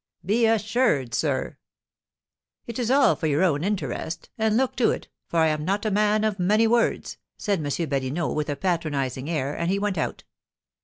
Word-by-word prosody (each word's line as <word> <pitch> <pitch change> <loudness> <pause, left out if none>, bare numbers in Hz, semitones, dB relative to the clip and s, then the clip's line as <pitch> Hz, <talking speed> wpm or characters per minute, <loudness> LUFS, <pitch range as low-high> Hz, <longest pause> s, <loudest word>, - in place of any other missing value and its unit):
"Be 225 +5 +3
assured, 220 - +1
sir - - -1 0.5
" - - -63
"It 235 +1 -6
is 240 -2 -1
all 275 +1 +5
for 160 - -2
your 150 +4 +2
own 155 -4 +2
interest, 170 -5 -3
and 220 0 +1
look 260 0 +1
to 245 - +4
it, - - -3 0.2
for 170 - -3
I 160 - +4
am 155 -1 -1
not 200 +5 -1
a 215 - +1
man 210 +1 +2
of 215 -3 0
many 210 +5 +3
words," 230 +1 +1 0.2
said 200 -4 0
M. 155 - -4 0.2
Badinot, 140 +4 -1
with 150 0 -2
a 145 - -1
patronising 145 -6 -2
air, 145 -3 -1
and 170 +1 -1
he 195 - +1
went 200 -4 -1
out. - - -3
190 Hz, 195 wpm, -25 LUFS, 155-220 Hz, 0.5 s, all